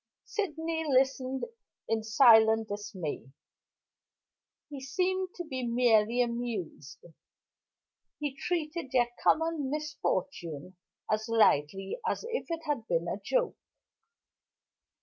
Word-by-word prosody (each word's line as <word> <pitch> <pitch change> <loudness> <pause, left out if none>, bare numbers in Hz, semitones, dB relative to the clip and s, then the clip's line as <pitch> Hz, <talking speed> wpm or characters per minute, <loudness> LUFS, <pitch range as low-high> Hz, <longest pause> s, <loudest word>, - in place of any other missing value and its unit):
Sydney 325 -5 -2
listened 265 -1 +1 0.4
in 225 0 0
silent 220 -1 +5
dismay. 200 - -5 1.4
He 285 -3 -8
seemed 370 +7 -1
to 350 - -5
be 260 -5 -5
merely 235 -1 +3
amused; 235 - -5 1.1
he 290 -3 -3
treated 330 -1 -3
their 240 -2 +3
common 320 -4 +2
misfortune 190 - -3 0.4
as 215 +1 0
lightly 195 - +2
as - - -3
if 480 +1 -3
it 330 -1 -3
had 285 -7 -2
been 170 0 0
a 195 - -3
joke. - - 0
250 Hz, 100 wpm, -30 LUFS, 215-305 Hz, 1.4 s, silent